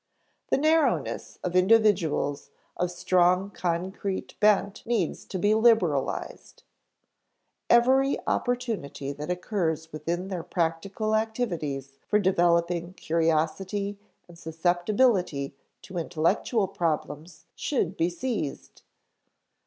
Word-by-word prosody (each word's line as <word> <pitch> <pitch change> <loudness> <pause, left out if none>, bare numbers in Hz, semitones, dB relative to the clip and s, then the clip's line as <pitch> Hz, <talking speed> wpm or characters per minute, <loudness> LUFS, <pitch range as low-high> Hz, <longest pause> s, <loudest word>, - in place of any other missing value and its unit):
The - - +3
narrowness 310 +2 +1
of 180 -1 -3
individuals 185 -8 +3 0.3
of 180 - -1
strong 180 +2 +2
concrete 185 +2 -3
bent 205 -1 +3
needs 235 0 -1
to 190 - -5
be 205 +4 +3
liberalized. 220 - +1 1.1
Every 260 +3 +4
opportunity 215 - -2
that 145 +3 -7
occurs 170 -4 -2
within 170 +5 -3
their 185 -3 -3
practical 185 +6 -2
activities 165 - -2
for 210 - +3
developing 175 -2 +1
curiosity 170 +6 -1 0.3
and 170 -1 -15
susceptibility 175 - +1 0.3
to 180 0 -5
intellectual 180 +6 0
problems 165 -1 -3
should 195 - -1
be 170 -1 +1
seized. 180 - -4
180 Hz, 95 wpm, -27 LUFS, 165-210 Hz, 1.1 s, Every